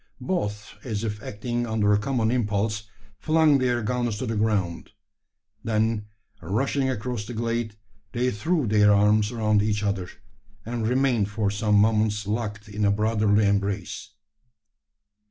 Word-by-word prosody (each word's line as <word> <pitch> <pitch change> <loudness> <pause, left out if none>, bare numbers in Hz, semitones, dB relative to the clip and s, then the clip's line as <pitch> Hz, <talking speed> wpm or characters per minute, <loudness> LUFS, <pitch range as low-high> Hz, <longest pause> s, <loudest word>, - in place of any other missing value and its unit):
Both, 105 - -3
as 110 -3 -3
if 105 -2 -3
acting 120 +3 -3
under 105 -2 +2
a 100 - +3
common 115 -1 0
impulse, 105 -2 -1 0.3
flung 155 -1 +4
their 125 -2 0
guns 120 -1 -1
to 130 - -3
the 115 -1 -2
ground. 105 -5 -1 0.7
Then, 110 -1 0 0.3
rushing 130 - 0
across 120 -2 -3
the 120 - -6
glade, 115 -1 -2 0.4
they 125 +1 0
threw 155 - 0
their 105 -1 +4
arms 105 +1 +3
around 110 -3 +2
each 105 0 0
other; 100 -3 -1 0.6
and 115 -1 -2
remained 125 -4 +2
for 105 -2 -1
some 105 0 +1
moments 105 0 +2
locked 105 0 -3
in 105 0 -4
a 100 - +4
brotherly 105 0 +2
embrace. 100 0 -1
110 Hz, 140 wpm, -25 LUFS, 105-120 Hz, 0.7 s, flung